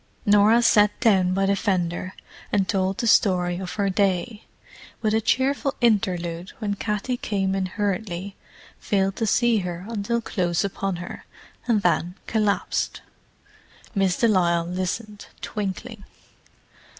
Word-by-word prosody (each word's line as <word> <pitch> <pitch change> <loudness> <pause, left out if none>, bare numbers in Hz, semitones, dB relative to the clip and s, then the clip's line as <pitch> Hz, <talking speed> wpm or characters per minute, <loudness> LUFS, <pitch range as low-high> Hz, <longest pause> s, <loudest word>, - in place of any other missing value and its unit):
Norah 210 +3 +5
sat 210 -3 +4
down 190 -6 +3
by 195 0 +2
the 200 +1 +2
fender 185 -1 -1 0.4
and 195 -2 +2
told 190 +1 0
the - - -2
story 180 -5 +3
of 185 -2 -5
her 200 -2 0
day—with 205 +2 -3
a 220 - +2
cheerful 265 +4 +1
interlude 185 -6 0
when 210 -3 -2
Katty 210 +4 -2
came 195 -4 -1
in 190 -1 -1
hurriedly, 200 -1 -3 0.4
failed 195 -2 0
to 225 - 0
see 240 +1 +3
her 180 -1 -5
until 230 +1 -1
close 175 -6 -1
upon 195 -1 -2
her, 175 0 -8 0.4
and 215 -4 +2
then 175 +1 +1
collapsed. 215 -2 -1 0.9
Miss 195 -4 +1
de 235 - +3
Lisle 170 -5 +2
listened, 185 +4 -4
twinkling. 210 +2 -5
200 Hz, 130 wpm, -24 LUFS, 185-220 Hz, 0.9 s, Norah